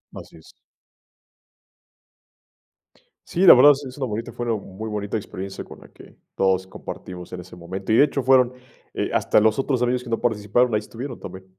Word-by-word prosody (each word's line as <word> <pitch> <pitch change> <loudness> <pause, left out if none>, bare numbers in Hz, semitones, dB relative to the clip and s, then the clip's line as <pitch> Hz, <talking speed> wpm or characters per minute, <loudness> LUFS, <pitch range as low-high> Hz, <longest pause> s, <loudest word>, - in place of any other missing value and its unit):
Así - - -11
es. - - -17 2.8
Sí, 175 - -2
la - - +11
verdad 145 +4 +8
es 140 +1 -7
es 130 +1 -9
una 135 - -2
bonita 115 0 -5
forma, 120 -2 -2
muy 105 +2 -7
bonita 105 0 -3
experiencia 95 -2 -7
con - - -13
la - - -16
que - - -17 0.2
todos 95 -1 +1
compartimos 90 -1 -9
en 90 - -5
ese 90 0 -14
momento, 95 +4 -6
y 110 - +4
de 145 - +7
hecho 140 -2 -3
fueron, 130 -1 +4 0.4
eh, - - -2
hasta - - +3
los 110 +3 +2
otros 130 -2 0
amigos 125 0 +1
que 125 - -10
no 115 - -1
participaron, 110 +1 +1
ahí 105 - +3
estuvieron 120 +4 -8
también. 95 0 -10
110 Hz, 185 wpm, -23 LUFS, 95-125 Hz, 2.8 s, la